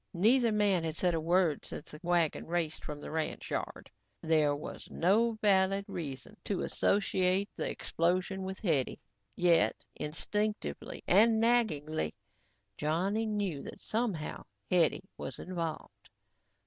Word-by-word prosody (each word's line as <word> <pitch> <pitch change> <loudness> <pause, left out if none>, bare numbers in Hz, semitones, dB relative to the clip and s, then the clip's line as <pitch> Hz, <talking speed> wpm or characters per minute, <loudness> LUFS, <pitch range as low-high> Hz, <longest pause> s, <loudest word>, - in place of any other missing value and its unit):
Neither 230 +6 +4
man 205 -5 +2
had 160 -1 -2
said 180 +1 +1
a 165 - +1
word 170 -2 +2
since - - -8
the 150 - -10
wagon 175 -3 +1
raced 165 -2 -2
from 150 -1 -6
the - - -8
ranch 160 0 -3
yard. - - -4 0.3
There 155 -3 +3
was 145 - -8
no 220 +7 +3
valid 195 -1 +3
reason 160 0 -6
to 200 - -1
associate 195 0 +2
the - - -2
explosion 185 +3 0
with 190 0 -4
Hetty, 155 - 0 0.4
yet 170 -2 +4 0.2
instinctively 210 +8 -3
and 220 +4 +5
naggingly, 155 - +1 0.6
Johnny 190 +9 0
knew 200 -9 -1
that - - -8
somehow 215 -9 -2 0.3
Hetty 175 +1 +3 0.2
was - - -5
involved. 170 -3 -5
180 Hz, 130 wpm, -31 LUFS, 160-205 Hz, 0.6 s, and